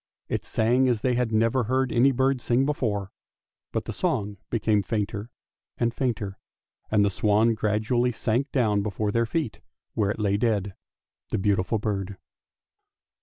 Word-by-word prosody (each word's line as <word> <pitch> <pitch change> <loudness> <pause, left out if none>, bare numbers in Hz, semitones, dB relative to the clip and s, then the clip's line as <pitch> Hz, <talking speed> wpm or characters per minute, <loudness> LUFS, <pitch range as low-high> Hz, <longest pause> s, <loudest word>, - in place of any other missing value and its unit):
It - - -1
sang 125 +4 +2
as 115 -3 0
they 125 - +1
had 120 -2 0
never 115 +3 +2
heard 130 +2 +1
any 125 +3 +4
bird 130 0 +1
sing 125 +3 +2
before; 105 -9 -1 0.6
but - - -2
the - - -4
song 100 0 -1
became 110 -2 +2
fainter 105 +1 -3 0.5
and 120 0 0
fainter, 110 -7 -2 0.5
and 105 -1 +4
the 100 - +1
swan 105 +4 +3
gradually 110 +3 +1
sank 120 +4 -1
down 110 -6 +2
before 105 0 -2
their 115 +1 +1
feet, 150 -3 -2 0.3
where 105 -3 +1
it 105 - -2
lay 100 -2 +1
dead 100 -3 0 0.3
— - - -67
the - - 0
beautiful 100 +2 +1
bird. 100 -2 -3
110 Hz, 160 wpm, -26 LUFS, 105-125 Hz, 0.6 s, any